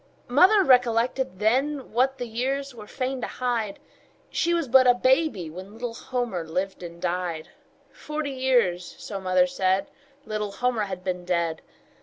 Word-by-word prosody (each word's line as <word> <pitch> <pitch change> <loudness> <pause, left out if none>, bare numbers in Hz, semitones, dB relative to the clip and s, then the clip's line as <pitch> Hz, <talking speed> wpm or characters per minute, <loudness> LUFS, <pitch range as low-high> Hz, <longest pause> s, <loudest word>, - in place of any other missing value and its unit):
Mother 375 - +6
recollected 245 - +2
then 265 +7 0
What 265 +3 +2
the 245 - -4
years 265 +4 -2
were 215 -3 -11
fain 260 +1 -3
to - - -2
hide 235 -5 -2 0.5
She 340 - +1
was 335 -4 +1
but 260 +1 +6
a 245 - +6
baby 260 - +2
when 190 +4 -9
Little 230 +1 -5
Homer 240 -7 -3
lived 185 +5 -3
and 170 -1 -9
died; 175 -2 -3 0.4
Forty 300 -1 -4
years, 240 -10 +1
so 200 -3 -6
mother 185 -1 +3
said, 190 +2 0 0.3
Little 210 -1 -3
Homer 245 -2 0
had 185 -2 -6
been 180 -1 -3
dead. 170 -2 -1
230 Hz, 155 wpm, -25 LUFS, 185-260 Hz, 0.5 s, Mother